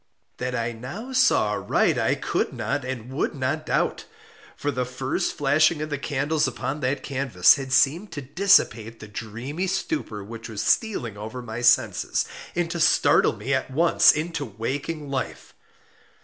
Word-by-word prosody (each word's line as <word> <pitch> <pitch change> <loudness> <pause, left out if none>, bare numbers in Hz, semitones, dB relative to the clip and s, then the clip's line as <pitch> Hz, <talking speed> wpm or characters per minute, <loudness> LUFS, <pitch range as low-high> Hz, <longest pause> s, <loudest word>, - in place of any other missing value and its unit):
That 125 0 -3
I 115 -1 -1
now 175 - -8
saw 260 - +3
aright - - +1
I - - +2
could - - -2
not 145 -1 -2
and 130 -1 -6
would 150 - -1
not 140 +4 -2
doubt; - - 0 0.5
for 145 - -1
the 125 -1 -1
first 130 +1 -2
flashing 150 +3 +3
of 155 0 -4
the 145 - -2
candles 145 +2 0
upon 135 +3 -4
that 135 +1 -1
canvas 130 -9 +4
had 135 -2 -5
seemed 140 +10 +2
to 145 - -5
dissipate 130 - +2
the 110 - -10
dreamy 115 - -5
stupor 180 - -3
which 115 +3 -9
was 110 -1 -4
stealing 125 - 0
over 110 +4 -7
my 115 0 -6
senses, 120 -1 +2 0.3
and 175 -1 -1
to 170 - -3
startle - - +4
me 135 - -3
at 130 0 0
once 165 +6 +5
into 160 0 -3
waking 140 +6 -4
life. 135 - -4
135 Hz, 165 wpm, -24 LUFS, 120-155 Hz, 0.5 s, once